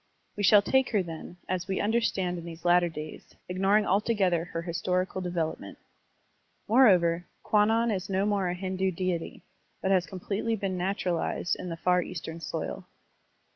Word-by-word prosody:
We 205 - -4
shall 205 0 +6
take 265 +4 +2
her, 205 -3 +3
then, 165 +1 -8
as 185 0 -2
we 190 - -1
understand 205 -5 0
her - - -4
in 170 - -9
these 165 0 -10
latter 175 0 +4
days, 155 -1 -9
ignoring 195 +3 +2
altogether 195 -4 +1
her 170 -1 -5
historical 180 +2 -1
develop 175 -3 -2
ment. - - -10 0.9
Moreover, 180 -8 +4 0.2
Kwannon 225 +2 +3
is 190 -1 -3
no 195 +1 +1
more 200 -3 +1
a 175 - -2
Hindu 190 +1 -1
deity, 180 -2 -3 0.4
but 190 - 0
has 185 -2 +3
completely 200 +4 -2
been 195 -3 -2
naturalized 180 -1 -1
in 180 - -6
the 165 - -5
Far 180 +1 +2
Eastern 165 -2 -6
soil. 165 - -5
185 Hz, 165 wpm, -28 LUFS, 175-200 Hz, 0.9 s, shall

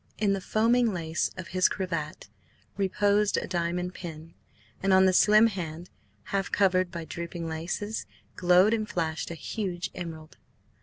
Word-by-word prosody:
In 205 -2 +2
the 195 - -2
foaming 230 +3 +2
lace 170 -3 -1
of 185 - -7
his 185 +1 +3
cravat 165 - -4 0.5
reposed 200 +1 +2
a - - -1
diamond 180 0 -2
pin, 165 -2 -9 0.5
and 195 0 +2
on 190 0 +6
the 185 - +4
slim 215 +4 +6
hand, 175 -5 -4 0.3
half 195 -4 -2
covered 185 -2 +3
by 170 -2 -6
drooping 170 0 -5
laces, 175 +7 -4 0.3
glowed 180 +4 +5
and 215 -2 -1
flashed 160 -2 -2
a 170 - -5
huge 180 0 -4
emerald. 160 -3 -8
180 Hz, 150 wpm, -28 LUFS, 170-200 Hz, 0.5 s, on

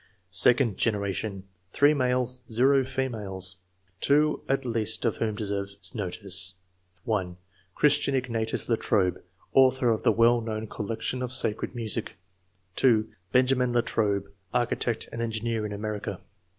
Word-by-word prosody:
Second 120 -4 +6
generation, 100 -2 -2 0.2
— 90 0 -41
3 145 +1 +4
males, 125 -2 0 0.5
females; 105 -8 -1 0.4
2 150 +5 +2
at 135 0 0
least 110 -2 0
of 115 - 0
whom 110 -2 -1
deserve 100 -2 -3 0.2
notice: 95 -2 -2 0.2
— 90 0 -41
(1) 95 -7 -2 0.4
Christian 145 -1 +3
Ignatius 115 -4 -2
Latrobe, 105 -5 +1 0.3
author 130 -2 +4
of 110 - -1
the - - +3
well 115 +1 +4
known 110 -1 -4
col 105 -1 -6
lection 120 +3 -3
of 125 -1 -3
sacred 120 -1 0
music; 115 -1 -2 0.6
(2) 115 -5 +3 0.2
Benjamin 125 -1 +2
Latrobe, 100 -4 0 0.2
architect 120 -1 0
and 115 - -5
engineer 115 -1 -2
in - - -9
America. 105 -2 -4
115 Hz, 130 wpm, -27 LUFS, 100-125 Hz, 0.6 s, Second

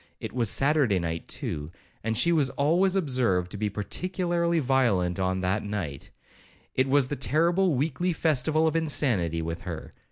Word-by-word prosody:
It - - -6
was 120 -4 +1
Saturday 135 -7 +3
night, 85 -1 -3
too, 75 +2 -4 0.3
and 115 0 -1
she 170 - +3
was 150 -5 +2
always 170 +8 +2
observed 125 - +1
to - - -5
be 105 0 -1
particularly 170 - -1
violent 120 - +1
on 95 0 0
that 95 +3 0
night,—it 105 - -6
was 140 0 +3
the 145 - -4
terrible 165 - +2
weekly 155 +6 0
festival 155 -1 +1
of 160 - +1
insanity 115 - +1
with 85 +1 -4
her. 85 -5 -7
130 Hz, 155 wpm, -27 LUFS, -, 0.3 s, Saturday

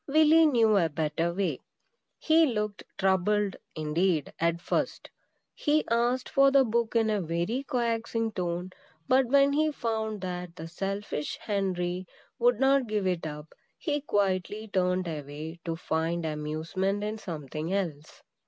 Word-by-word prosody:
Willy 315 +2 +6
knew 225 -7 +4
a 170 -4 +3
better 160 +2 -1
way. 190 +2 -1 0.6
He 320 0 +4
looked 210 -4 -2 0.2
troubled, 195 +1 +1 0.2
indeed, 155 +1 0
at 170 0 +1
first. - - -2 0.4
He 300 +1 +1
asked 240 +2 +1
for 275 0 +5
the 275 0 +5
book 235 0 0
in 225 -1 +3
a 210 -2 +1
very 170 +9 -1
coaxing 230 -2 0
tone; 180 -1 -3 0.4
but 260 0 +4
when 280 +2 +4
he 310 +1 +2
found 220 -5 -2
that 180 -2 -5
the 165 -1 -7
selfish 195 -3 -3
Henry 185 -3 -2 0.3
would - - +3
not 270 -1 +3
give 210 -2 -1
it 180 -3 0
up, 150 0 -8 0.2
he 295 -4 -1
quietly 205 -3 -1
turned 180 -2 0
away 155 +1 -6
to 165 -1 -2
find 165 +1 -1
amusement 160 +6 -2
in 215 +1 -3
something 155 -2 -5
else. 165 -7 -3
195 Hz, 145 wpm, -28 LUFS, 170-230 Hz, 0.6 s, Willy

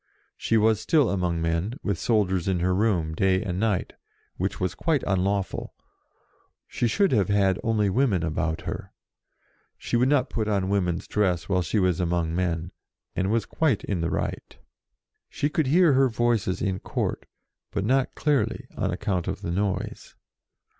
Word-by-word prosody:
She 115 - +1
was 110 0 +3
still 145 +4 +3
among 90 -4 -1
men, 85 +8 -1
with 100 -5 -1
soldiers 95 -6 +1
in 95 -2 +1
her 90 +2 +1
room, 90 -6 +1
day 95 +3 +2
and 90 -3 -3
night, 105 -4 0 0.4
which - - -3
was 90 -1 -1
quite 160 -5 0
unlawful; 95 0 -1 0.9
she 120 - -1
should 200 - +2
have 105 -7 +2
had 100 -2 +2
only 110 -2 +1
women 100 -4 +2
about 80 0 -1
her. - - -6 0.8
She - - -3
would 125 +2 +3
not 140 -3 +3
put 110 -2 -1
on 100 -3 0
women's 90 -4 0
dress 95 -5 0
while 95 -2 +1
she 90 +6 -1
was 95 -3 +2
among 85 -2 0
men, 85 -1 -1 0.4
and 95 +1 0
was 110 -1 +1
quite 160 +4 0
in 95 -4 -2
the 85 - 0
right. - - -4 0.7
She 145 - -1
could 155 -2 0
hear 165 +1 +5
her 135 0 +4
Voices 115 -5 0
in 95 -3 -1
Court, - - -3 0.4
but 100 - -2
not 130 +3 +1
clearly 145 -4 0
on - - -1
account 90 -4 -2
of - - -4
the 85 - -2
noise. 100 +1 -3
100 Hz, 165 wpm, -25 LUFS, 90-115 Hz, 0.9 s, hear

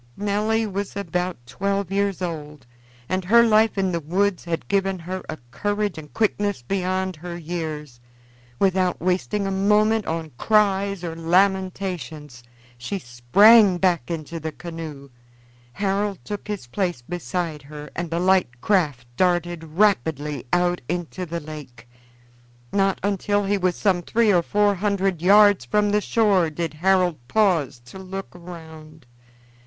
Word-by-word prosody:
Nelly 210 +2 0
was 200 -1 -4
about 180 -2 -2
twelve 195 +7 -2
years 200 -1 0
old, 150 -5 -6 0.4
and 185 0 -1
her 235 +5 +6
life 220 -1 +3
in 190 -1 +1
the 170 - -1
woods 180 +5 0
had 165 -1 -3
given 195 -1 +1
her 185 +2 -5
a - - -4
courage 205 - -1
and 150 -2 -10
quickness 205 - 0
beyond 185 +3 -1
her 170 +2 -7
years. 155 -6 -5 0.6
Without 185 0 +1
wasting 185 +3 0
a 195 - -1
moment 210 +3 +2
on 160 -1 -3
cries 200 -3 +2
or 165 -2 -4
lamentations, 180 -5 -1 0.4
she 125 +12 -3
sprang 185 - +5
back 175 -8 +1
into 165 0 -5
the 160 0 -4
canoe. 155 -4 -8 0.6
Harold 200 +2 -1
took 205 -1 -6
his 210 -10 -4
place 175 0 -2
beside 165 +1 -4
her, 150 +1 -10
and 175 -1 -3
the 165 +1 -1
light 180 -10 +2
craft 150 - +1
darted 175 -2 +1
rapidly 155 - 0
out 175 0 +2
into 175 +1 -3
the 170 +1 -3
lake. 145 -7 -10 0.9
Not 195 -1 +2
until 205 0 0
he 200 +1 +1
was 180 -1 +1
some 190 -4 +1
three 220 +3 +2
or 175 - +4
four 205 +4 +2
hundred 195 -3 0
yards 205 -2 +6
from 205 +12 +1
the 210 0 +2
shore 200 -7 +2
did 160 0 -4
Harold 180 -1 +2
pause 170 - +1
to 160 +10 -11
look 190 +1 -6
round. 160 -4 -12
180 Hz, 145 wpm, -23 LUFS, 160-200 Hz, 0.9 s, her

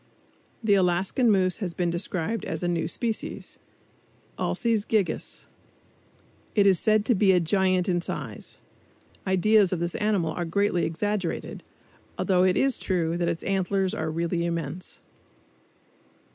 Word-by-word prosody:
The 215 -2 +3
Alaskan 190 +6 +2
moose 185 -3 +2
has 185 -6 -4
been 175 -1 0
described 180 +4 -2
as 160 +1 -4
a - - +1
new 170 -2 0
species 225 +5 -4 0.8
(Alces 230 -4 0
gigas). 210 -5 -1 1.1
It 205 -2 +4
is 190 -4 +5
said 215 -1 +2
to 245 - +3
be 195 -2 +4
a 180 - +4
giant 185 +2 +1
in 175 -2 +1
size. - - -6 0.7
Ideas 195 +1 +4
of 185 - -1
this 170 0 -2
animal 205 -6 0
are 175 - -3
greatly 180 +1 +1
exaggerated, 190 +2 -3 0.6
although 185 -2 +2
it 185 0 +3
is 270 -2 +2
true 170 -3 0
that 170 -1 0
its 170 -1 -3
antlers 195 0 0
are 160 -8 -2
really 170 +1 -1
immense. 170 0 -4
185 Hz, 140 wpm, -26 LUFS, 170-205 Hz, 1.1 s, is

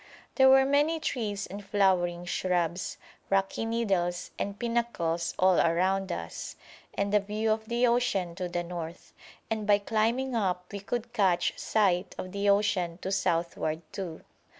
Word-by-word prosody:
There 265 0 +6
were 265 0 +7
many 295 +4 +2
trees 210 -9 -2
and 205 +2 -8
flowering 185 -4 +1
shrubs, 175 -1 -1 0.3
rocky 195 +3 +1
needles, 195 -6 -1
and 200 0 -3
pinnacles 195 -9 -1
all 185 -1 +4
around 185 +3 +2
us, 85 -1 -5 0.4
and 200 +1 -1
a 210 - +6
view 210 +2 -1
of 220 0 -1
the 235 +2 +1
ocean 235 -8 +1
to 180 +1 -4
the 175 0 -2
north; 170 -1 -7 0.4
and 215 -1 -2
by 205 -1 +6
climbing 230 +5 0
up 180 -4 -1
we 200 - -3
could 235 +4 -4
catch 180 -4 +2
sight 190 -4 +1
of 185 - -6
the 200 +1 0
ocean 200 -4 +2
to 190 - -2
southward 170 -4 -1
too. 175 -5 -5
195 Hz, 150 wpm, -29 LUFS, 175-220 Hz, 0.4 s, were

